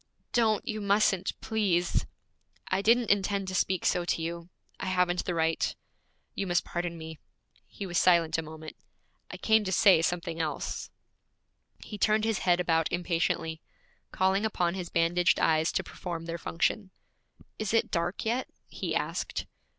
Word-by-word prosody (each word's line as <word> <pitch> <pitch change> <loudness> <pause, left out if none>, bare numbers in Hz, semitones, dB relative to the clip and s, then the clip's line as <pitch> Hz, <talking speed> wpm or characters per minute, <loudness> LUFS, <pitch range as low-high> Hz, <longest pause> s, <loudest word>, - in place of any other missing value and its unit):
'Don't! 220 -3 +2
You 215 -1 -3
mustn't, 200 -2 +1
please!' 195 -6 0 0.6
'I 190 +1 +1
didn't 230 +2 +4
intend 200 -1 +1
to - - -5
speak 185 -1 0
so 175 - +2
to 175 - -1
you. 170 +1 -5 0.3
I - - -4
haven't 180 -1 +1
the 175 - -2
right. 165 0 0 0.6
You 195 - -3
must 175 -1 +2
pardon 175 -1 -3
me.' 160 -1 -8 0.5
He 200 - -7
was 175 -2 0
silent 170 -3 +4
a - - 0
moment. 155 0 -9 0.5
'I - - -7
came 220 -1 +3
to 190 - -3
say 190 -4 +6
something 170 0 -1
else.' 155 -2 -3 0.9
He 210 - -8
turned 215 +1 +3
his 225 -3 0
head 175 -1 +2
about 165 -2 +1
impatiently, 165 -2 -1 0.5
calling 190 +2 +2
upon 180 -5 0
his 180 -2 -5
bandaged 170 +1 +2
eyes 160 0 +3
to - - 0
perform 170 -2 -6
their 170 0 -4
function. 185 +5 -1 0.7
'Is 215 -2 -2
it 225 - +2
dark 170 +4 -1
yet?' 240 +4 0 0.2
he - - -3
asked. - - -2
180 Hz, 160 wpm, -29 LUFS, 165-200 Hz, 0.9 s, say